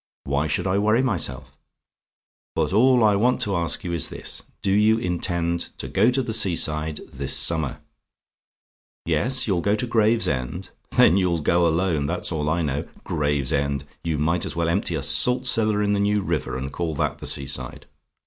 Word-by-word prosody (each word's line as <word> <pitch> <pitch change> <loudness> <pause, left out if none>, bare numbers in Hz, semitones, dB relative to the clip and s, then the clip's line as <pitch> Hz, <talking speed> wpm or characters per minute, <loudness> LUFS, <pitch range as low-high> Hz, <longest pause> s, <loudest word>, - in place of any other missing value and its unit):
Why 70 +2 -1
should 75 - -2
I 95 +1 +1
worry 110 +4 +2
myself? 65 - -2 1.0
"But - - -1
all 125 +3 +4
I 105 -1 +4
want 125 +6 +2
to 100 -5 0
ask 85 -3 -1
you 85 - -4
is 85 - +1
this: - - -4 0.2
do 95 - 0
you 105 +2 +4
intend 85 -3 -2
to - - -6
go 105 +5 +2
to 130 +1 0
the 115 -2 -4
sea 100 -5 +3
side 75 -1 -1
this 70 0 0
summer? 80 -5 +1 1.2
"YES? 130 +1 +2
YOU'LL 95 -5 0
GO 100 +4 +1
TO 110 - -2
GRAVESEND? 95 - 0 0.3
"Then 85 - +6
you'll 90 -4 0
go 85 +3 +2
alone, 80 -3 0
that's 90 +2 -3
all 75 -2 -2
I 85 +2 0
know. 70 -1 -3 0.2
Gravesend! 70 -1 -1 0.2
You 80 -2 -2
might 80 +4 0
as - - -3
well 85 0 0
empty 90 0 -1
a 70 - -3
salt 125 - +4
cellar 110 -4 +1
in 105 0 +1
the 100 - 0
New 105 +1 +1
River, 80 -8 -3
and 65 +1 -5
call 80 -1 -3
that - - -2
the - - -3
sea 70 - +1
side. 65 -2 -6
85 Hz, 185 wpm, -23 LUFS, 75-105 Hz, 1.2 s, Then